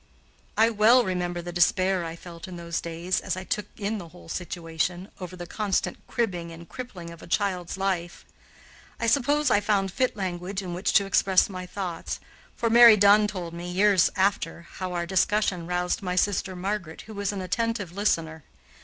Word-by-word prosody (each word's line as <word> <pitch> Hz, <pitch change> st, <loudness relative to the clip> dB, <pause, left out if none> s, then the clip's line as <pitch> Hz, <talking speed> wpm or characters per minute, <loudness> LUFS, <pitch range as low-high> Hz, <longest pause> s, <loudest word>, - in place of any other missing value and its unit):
I 225 Hz, +1 st, +5 dB
well 230 Hz, +4 st, +5 dB
remember 175 Hz, -3 st, -2 dB
the 175 Hz, -, -5 dB
despair 185 Hz, +1 st, +2 dB
I 165 Hz, 0 st, -5 dB
felt 170 Hz, 0 st, -10 dB
in 185 Hz, -, -8 dB
those 170 Hz, -1 st, -3 dB
years, 170 Hz, +2 st, -1 dB
as -, -, -3 dB
I 185 Hz, -, -5 dB
took 210 Hz, +2 st, -2 dB
in 210 Hz, +1 st, -2 dB
the 175 Hz, -, -8 dB
whole 85 Hz, -, -15 dB
situation, 175 Hz, +1 st, -3 dB
over 185 Hz, -1 st, -7 dB
the 175 Hz, -1 st, -7 dB
constant 200 Hz, +1 st, -1 dB
cribbing 180 Hz, -8 st, -2 dB
and 165 Hz, 0 st, -11 dB
crippling 190 Hz, -10 st, -8 dB
of 170 Hz, -, -12 dB
a -, -, -11 dB
child's 185 Hz, -1 st, -1 dB
life. 185 Hz, -2 st, -2 dB, 0.7 s
I -, -, -1 dB
suppose 285 Hz, +4 st, +2 dB
I 205 Hz, -, +5 dB
found 200 Hz, -2 st, +1 dB
fit 255 Hz, +6 st, 0 dB
language 190 Hz, 0 st, -3 dB
in 180 Hz, -2 st, -5 dB
which 180 Hz, +3 st, -1 dB
to 200 Hz, -, +5 dB
express 195 Hz, -1 st, +3 dB
my 185 Hz, -2 st, -6 dB
thoughts, 180 Hz, -3 st, -4 dB, 0.4 s
for 235 Hz, -, -1 dB
Mary 230 Hz, -1 st, +9 dB
Dunn 205 Hz, +1 st, +6 dB
told 180 Hz, -5 st, -5 dB
me, 175 Hz, +1 st, -6 dB
years 195 Hz, 0 st, +4 dB
after, 190 Hz, -3 st, 0 dB
how 185 Hz, -1 st, -5 dB
our 170 Hz, -1 st, -1 dB
discussion 190 Hz, -1 st, +1 dB
roused 180 Hz, +2 st, -1 dB
my 180 Hz, -2 st, -2 dB
sister 190 Hz, 0 st, 0 dB
Margaret, 180 Hz, -3 st, -4 dB
who 220 Hz, -, -11 dB
was 200 Hz, -1 st, -2 dB
an 200 Hz, -2 st, -4 dB
attentive 205 Hz, 0 st, -2 dB
listener. 165 Hz, -5 st, -1 dB
185 Hz, 185 wpm, -26 LUFS, 175-205 Hz, 0.7 s, Mary